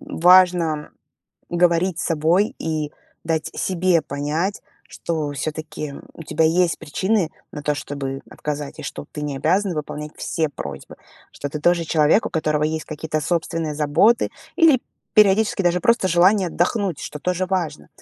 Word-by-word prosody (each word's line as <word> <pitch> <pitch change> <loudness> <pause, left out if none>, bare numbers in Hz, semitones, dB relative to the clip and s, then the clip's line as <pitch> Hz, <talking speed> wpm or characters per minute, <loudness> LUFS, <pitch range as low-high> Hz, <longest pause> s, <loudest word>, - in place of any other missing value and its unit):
важно 175 -3 +4 0.6
говорить 175 0 +2
с - - -2
собой 165 +6 +2
и 155 -2 -3 0.3
дать 160 -1 -1
себе 180 -2 +1
понять, 150 +8 -2 0.3
что 155 -3 -3
всё-таки, 155 -1 -5 0.2
у 165 - -9
тебя 160 +1 0
есть 170 +1 +2
причины 185 +2 0 0.2
на 150 - -6
то, 150 0 0
чтобы 135 -1 -5
отказать, 145 -1 -5
и - - -7
что 145 - -6
ты 150 - -6
не 145 -2 -3
обязана 180 +5 +1
выполнять 150 0 -5
все 160 -2 -1
просьбы, 70 - -8 0.4
что 145 - -5
ты 150 +1 -5
тоже 175 +1 +2
человек, 155 +6 +3
у - - -4
которого 155 -2 0
есть 155 +1 -2
какие-то 155 0 -3
собственные 160 -1 -1
заботы 155 - +3 0.3
или 315 -7 +5 0.3
периодически 210 -1 +4
даже 175 0 +2
просто 235 -5 +3
желание 185 +2 +4
отдохнуть, 180 -1 0
что 150 - -6
тоже 180 +2 -1
важно. 165 - -2
165 Hz, 150 wpm, -22 LUFS, 150-185 Hz, 0.6 s, или